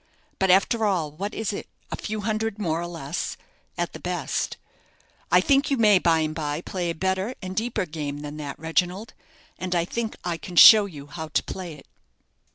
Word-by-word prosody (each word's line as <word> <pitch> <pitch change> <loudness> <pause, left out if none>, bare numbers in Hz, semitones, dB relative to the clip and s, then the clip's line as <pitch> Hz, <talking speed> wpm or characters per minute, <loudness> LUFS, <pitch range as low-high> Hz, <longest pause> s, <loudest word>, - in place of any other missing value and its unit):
But 190 - +2
after 200 +5 +4
all, 180 -8 +1
what 195 +8 -5
is 220 -1 -2
it? - - -6 0.2
a - - -1
few 215 0 -4
hundreds 220 0 -1
more 170 -5 -1
or 175 - -4
less, 165 -2 -4 0.4
at - - -2
the - - -8
best. - - -2 0.7
I - - +7
think 280 -1 +3
you 275 - +1
may 210 -4 +6
by 165 -2 +3
and 155 0 -1
by 150 0 -3
play 180 -1 -3
a 165 - -2
better 190 +7 -1
and 185 -1 -6
a - - -7
deeper 225 -2 -1
game 150 -3 -5
than 150 0 -7
that, 145 -2 -6
Reginald, 180 +6 -1 0.5
and 180 -1 -2
I 170 -1 +2
think 225 +4 -3
I 175 -2 -2
can 180 +1 -9
show 210 +3 +10
you 145 -7 -10
how 160 +2 -7
to 155 - 0
play 180 -3 -6
it." 145 - -15
180 Hz, 205 wpm, -25 LUFS, 160-210 Hz, 0.7 s, show